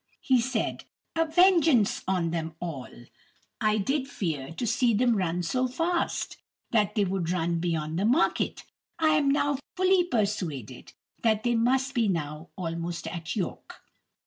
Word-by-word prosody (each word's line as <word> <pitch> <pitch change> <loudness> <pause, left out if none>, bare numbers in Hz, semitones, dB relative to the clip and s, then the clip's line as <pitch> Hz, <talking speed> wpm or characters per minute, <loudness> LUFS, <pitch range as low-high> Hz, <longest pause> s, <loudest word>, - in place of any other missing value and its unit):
He 255 -3 +3
said, 235 -2 -2 0.3
"A 325 0 +2
vengeance 320 - +4
on 180 -3 +1
them 165 -1 -3
all. 160 -7 -5 0.7
I 215 -1 +3
did 265 +7 0
fear, 160 - -3
to 205 +9 -3
see 235 0 +2
them 240 +1 +3
run 180 -2 -1
so 255 +9 0
fast, 335 +7 -1 0.3
that 210 -2 +2
they 205 -2 +3
would 185 -3 -2
run 170 -1 0
beyond 165 -1 -1
the 200 - +1
market. 260 +10 +1 0.3
I 320 -1 +3
am 300 -2 +3
now 285 0 +1 0.2
fully 370 -1 +4
persuaded 180 - -3 0.3
that 220 -2 +2
they 240 -1 +2
must 260 +4 +2
be 235 -4 +2
now 155 -3 -3
almost 170 -1 -4
at 165 -2 -5
York." 195 -5 -5
210 Hz, 150 wpm, -27 LUFS, 170-265 Hz, 0.7 s, vengeance